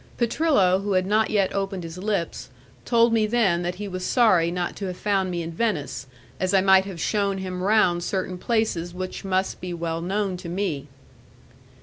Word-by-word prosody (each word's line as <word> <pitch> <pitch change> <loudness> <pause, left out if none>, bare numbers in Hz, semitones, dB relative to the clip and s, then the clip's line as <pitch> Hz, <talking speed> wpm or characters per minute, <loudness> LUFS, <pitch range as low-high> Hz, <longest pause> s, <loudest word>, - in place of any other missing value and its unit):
Petrillo, 235 - +2
who 200 0 -1
had 185 0 +2
not 215 +3 +2
yet 200 -3 +1
opened 195 -2 -2
his 165 +2 -7
lips, 200 -3 -2 0.4
told 235 -1 +4
me 220 -2 +3
then 210 -7 +2
that 175 0 -2
he 205 +2 -6
was 185 -1 -5
sorry 185 -8 +3
not 175 0 -3
to 200 - -4
have 180 -1 -5
found 195 -3 0
me 175 -1 -2
in 165 - -5
Venice, 160 - -2 0.3
as 185 +1 +1
I - - +6
might 190 0 +5
have 190 -4 -7
shewn 200 +1 0
him 185 -1 -5
round 185 -4 +3
certain 185 -1 -3
places 180 -6 -1
which 185 0 -5
must 190 0 -1
be 180 -1 -4
well 165 -1 -3
known 195 +1 -1
to 175 -1 -8
me. 170 -6 -2
190 Hz, 195 wpm, -24 LUFS, 175-205 Hz, 0.4 s, I